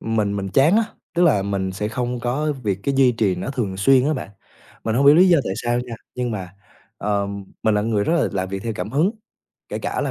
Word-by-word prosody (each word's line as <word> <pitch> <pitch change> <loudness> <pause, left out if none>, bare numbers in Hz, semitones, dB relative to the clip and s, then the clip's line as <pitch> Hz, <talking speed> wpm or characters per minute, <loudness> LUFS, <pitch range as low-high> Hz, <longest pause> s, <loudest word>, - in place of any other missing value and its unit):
mình 105 -3 -1
mình 100 -1 -3
chán 145 - +4
á, 225 - +3 0.3
tức 175 - +2
là 105 - +4
mình 95 -1 -2
sẽ 105 +2 -3
không 125 +2 -3
có 145 +6 -1
việc 100 -2 -1
cái 140 - 0
duy 130 -2 +4
trì 105 -5 +1
nó 90 +9 -4
thường 110 -9 -3
xuyên 130 +6 +4
á 155 - +1
bạn. 130 - -6 0.5
Mình 110 0 0
hông 140 - +3
hiểu 145 - +9
lý 185 +2 +6
do 170 -2 +5
tại - - -2
sao 120 0 0
nha, 125 -2 -7 0.2
nhưng 125 -1 -2
mà, 95 -4 -6 0.4
ờ, 100 -1 0 0.4
mình 110 -1 +2
là 105 - +2
người 105 -2 0
rất 165 - +1
là - - +1
làm 95 -1 -2
việc 95 0 -5
theo 115 - -2
cảm 90 +4 -4
hứng, 155 - +2 0.6
kể - - -4
cả - - -3
là - - -1
115 Hz, 255 wpm, -21 LUFS, 100-135 Hz, 0.6 s, hiểu